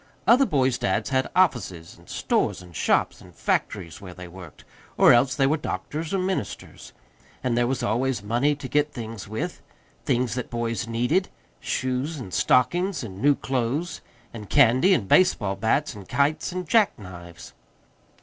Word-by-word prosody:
Other 260 Hz, +3 st, +5 dB
boys' 130 Hz, -4 st, +1 dB
dads 105 Hz, +6 st, -1 dB
had 130 Hz, 0 st, +1 dB
offices 105 Hz, -, 0 dB
and -, -, -20 dB
stores -, -, -1 dB
and 90 Hz, -2 st, -15 dB
shops -, -, +1 dB
and -, -, -16 dB
factories 85 Hz, -6 st, -2 dB
where 90 Hz, -3 st, -10 dB
they 90 Hz, -1 st, -9 dB
worked, 90 Hz, -3 st, -12 dB, 0.3 s
or -, -, +7 dB
else 125 Hz, +2 st, +3 dB
they 135 Hz, -, +2 dB
were 150 Hz, +4 st, +2 dB
doctors 155 Hz, +1 st, -4 dB
or 195 Hz, -, +1 dB
ministers; 185 Hz, -, -4 dB, 0.5 s
and 125 Hz, -2 st, 0 dB
there 120 Hz, 0 st, +2 dB
was 130 Hz, -1 st, -2 dB
always 120 Hz, -1 st, 0 dB
money 120 Hz, +8 st, +1 dB
to 140 Hz, -2 st, -7 dB
get 150 Hz, +2 st, +1 dB
things 115 Hz, -6 st, -7 dB
with 110 Hz, +2 st, -4 dB, 0.4 s
things 125 Hz, 0 st, 0 dB
that 125 Hz, 0 st, -4 dB
boys 115 Hz, -1 st, -3 dB
needed; 125 Hz, +12 st, 0 dB, 0.3 s
shoes 130 Hz, +5 st, -2 dB
and 115 Hz, -9 st, -8 dB
stockings 175 Hz, -, +2 dB
and 100 Hz, -3 st, -8 dB
new 145 Hz, +1 st, +4 dB
clothes, 135 Hz, +7 st, -2 dB, 0.3 s
and 105 Hz, -3 st, -9 dB
candy 140 Hz, +8 st, +5 dB
and 105 Hz, -, -2 dB
baseball 105 Hz, -, +3 dB
bats 115 Hz, +9 st, 0 dB
and 100 Hz, -3 st, -12 dB
kites 140 Hz, +7 st, +1 dB
and 180 Hz, -1 st, -5 dB
jack 220 Hz, 0 st, +3 dB
knives. 85 Hz, -4 st, -11 dB
125 Hz, 165 wpm, -25 LUFS, 105-150 Hz, 0.5 s, or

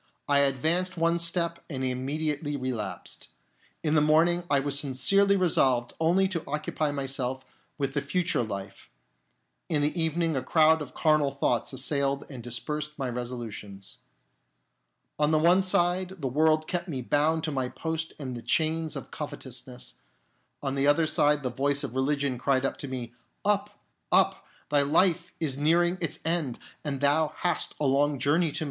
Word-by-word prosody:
I 140 Hz, -1 st, +4 dB
.advanced 160 Hz, +7 st, +2 dB
one 165 Hz, +1 st, +2 dB
step 170 Hz, 0 st, 0 dB
and 130 Hz, -4 st, -3 dB
immediately 145 Hz, +3 st, -2 dB
relapsed. 125 Hz, -6 st, -5 dB, 0.6 s
In 155 Hz, -2 st, +1 dB
the 155 Hz, -, +4 dB
morning 165 Hz, +3 st, +3 dB
I 140 Hz, -, +4 dB
was 140 Hz, 0 st, 0 dB
sincerely 195 Hz, +10 st, +3 dB
re 185 Hz, -1 st, +2 dB
solved 125 Hz, -6 st, +2 dB
only 175 Hz, +4 st, +3 dB
to 170 Hz, -4 st, -3 dB
occupy 150 Hz, +1 st, -1 dB
myself 130 Hz, -2 st, -3 dB, 0.3 s
with 140 Hz, -2 st, -2 dB
the 145 Hz, -, 0 dB
future 140 Hz, +1 st, 0 dB
life; 100 Hz, -3 st, -6 dB, 0.8 s
in 150 Hz, -4 st, +1 dB
the 155 Hz, +3 st, 0 dB
evening 165 Hz, 0 st, +1 dB
a 130 Hz, -, 0 dB
crowd 160 Hz, +1 st, +4 dB
of 145 Hz, -, -8 dB
carnal 155 Hz, -3 st, +3 dB
thoughts 135 Hz, -4 st, 0 dB
assailed 140 Hz, +1 st, 0 dB
and 130 Hz, -3 st, -7 dB
dispersed 150 Hz, +6 st, -4 dB
my 135 Hz, -3 st, -2 dB
resolutions. 110 Hz, -5 st, -7 dB, 1.2 s
On 150 Hz, 0 st, +3 dB
the 155 Hz, -, +3 dB
one 175 Hz, +4 st, +5 dB
side 185 Hz, 0 st, +2 dB
the 140 Hz, -6 st, -3 dB
world 155 Hz, +4 st, +2 dB
kept 175 Hz, 0 st, -2 dB
me 135 Hz, -7 st, -4 dB
bound 155 Hz, +5 st, +2 dB
to 155 Hz, -, -1 dB
my 130 Hz, -3 st, -1 dB
post 160 Hz, +2 st, -4 dB
in 135 Hz, -4 st, -5 dB
the 120 Hz, -, -6 dB
chains 160 Hz, +3 st, 0 dB
of -, -, -8 dB
covetousness, 130 Hz, -4 st, -7 dB, 0.7 s
on 135 Hz, -1 st, -1 dB
the 140 Hz, 0 st, +1 dB
other 145 Hz, +3 st, +4 dB
side 150 Hz, -1 st, +2 dB
the 125 Hz, -, -2 dB
voice 140 Hz, +3 st, 0 dB
of 120 Hz, -, -5 dB
religion 140 Hz, -1 st, 0 dB
cried 130 Hz, 0 st, +1 dB, 0.2 s
to 145 Hz, -, -6 dB
me, 125 Hz, -3 st, -5 dB, 0.2 s
" -, -, -44 dB
Up! -, -, 0 dB, 0.3 s
Up! -, -, +3 dB, 0.2 s
thy 145 Hz, -1 st, +5 dB
life 170 Hz, +4 st, +2 dB
is 140 Hz, -4 st, -1 dB
nearing 175 Hz, +4 st, +2 dB
its 165 Hz, -, -2 dB
end, 160 Hz, -7 st, 0 dB, 0.3 s
and 140 Hz, -3 st, -3 dB
thou 150 Hz, +2 st, +2 dB
hast 175 Hz, -1 st, -1 dB
a 150 Hz, -, 0 dB
long 140 Hz, +2 st, +2 dB
journey 150 Hz, +6 st, +2 dB
to -, -, -14 dB
make. -, -, -1 dB
145 Hz, 170 wpm, -27 LUFS, 130-160 Hz, 1.2 s, one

